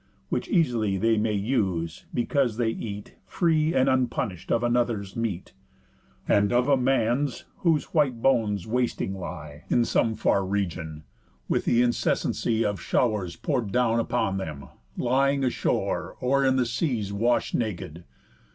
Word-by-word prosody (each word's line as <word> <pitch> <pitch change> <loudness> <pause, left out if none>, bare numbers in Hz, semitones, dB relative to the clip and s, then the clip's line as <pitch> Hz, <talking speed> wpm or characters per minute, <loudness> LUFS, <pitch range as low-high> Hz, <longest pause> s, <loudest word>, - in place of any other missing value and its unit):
Which - - -2
eas'ly 120 - +1
they 115 +3 +2
may 105 0 +1
use, 95 -7 -1
because 120 -1 0
they 120 -2 +1
eat, 105 -2 -6
Free 160 -2 +1
and 130 - +3
unpunish'd, 120 -8 -1
of 115 - +2
another's 120 -5 0
meat; 110 -6 -3 0.7
And 100 0 +3
of 125 +2 +2
a 140 - +5
man's, 130 +1 0
whose 165 +1 0
white 140 -7 +2
bones 110 -7 +1
wasting 120 -4 -1
lie 75 -5 -8
In 120 - +3
some 110 -1 +1
far 100 -2 +2
region; 85 -6 -3 0.4
with - - 0
th' 120 +1 +4
incessancy 115 -1 0
Of 105 -1 -2
show'rs 105 -8 0
pour'd 125 -10 -2
down 120 -1 +2
upon 100 -3 0
them, 75 -7 -6 0.3
lying 135 +2 +2
ashore, 125 - -1
Or 135 +2 +2
in 130 0 +3
the 130 -1 +2
seas 115 - -1
wash'd 120 +4 +1
nak'd. 85 -7 -3
115 Hz, 140 wpm, -26 LUFS, 100-125 Hz, 0.7 s, a